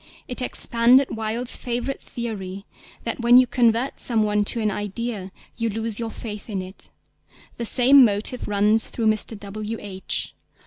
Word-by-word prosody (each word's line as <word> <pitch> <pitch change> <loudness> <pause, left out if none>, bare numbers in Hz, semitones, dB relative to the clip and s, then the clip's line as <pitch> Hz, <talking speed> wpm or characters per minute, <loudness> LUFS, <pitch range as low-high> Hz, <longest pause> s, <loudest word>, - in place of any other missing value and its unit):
It 250 - -5
expanded 250 +1 +3
Wilde's 225 +3 -2
favourite 245 +2 -3
theory 200 -5 -6 0.4
that 230 - -3
when 240 +1 +6
you 255 - +7
convert 240 +1 +1
some 225 -3 +1
one 210 0 +1
to 230 - +1
an 215 -1 0
idea, 205 -1 -4 0.3
you 230 -1 -1
lose 225 0 -3
your 230 -1 -3
faith 210 -1 -8
in 200 -3 -3
it; 185 +1 -9 0.7
the 235 - -3
same 260 +4 +6
motive 215 +3 +1
runs 210 +2 +3
through 230 - -4
_Mr. 215 0 0
W. 210 +2 -6
H. 190 -2 -4
225 Hz, 155 wpm, -23 LUFS, 210-240 Hz, 0.7 s, you